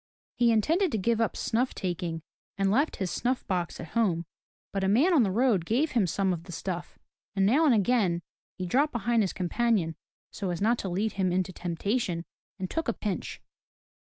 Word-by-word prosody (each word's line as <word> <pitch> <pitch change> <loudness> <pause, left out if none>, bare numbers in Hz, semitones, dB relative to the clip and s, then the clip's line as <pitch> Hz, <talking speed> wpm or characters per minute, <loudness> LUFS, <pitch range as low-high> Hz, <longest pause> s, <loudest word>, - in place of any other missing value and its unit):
He 240 -1 +4
intended 325 - +2
to - - +2
give 230 +3 +1
up 225 - 0
snuff 245 +3 0
taking 175 -3 -3 0.3
and 195 -1 +2
left 280 +9 +2
his 190 -3 -3
snuff 250 +1 -1
box 180 -3 -2
at 165 - -7
home, 185 -8 +1 0.5
but 195 -1 -1
a - - +2
man 265 - +4
on 305 - +6
the 210 - +2
road 220 -3 +2
gave 255 - +1
him 220 -7 +2
some 190 +2 +1
of 170 -1 -6
the 180 - -9
stuff, 175 +1 -5 0.4
and 195 -1 +3
now 275 +11 +4
and 280 - +5
again, 200 -5 +2 0.3
he 185 - -3
dropped 280 - +2
behind 235 0 +1
his 195 - 0
companion 185 -3 0 0.4
so 195 -3 -4
as 175 -2 -2
not 230 +4 +2
to 195 - -3
lead 205 +5 0
him 190 -2 0
into 185 +1 0
temptation, 175 +1 -2 0.3
and 185 -1 -3
took 325 - -3
a 235 - +1
pinch. 205 -5 -4
200 Hz, 200 wpm, -28 LUFS, 180-235 Hz, 0.5 s, on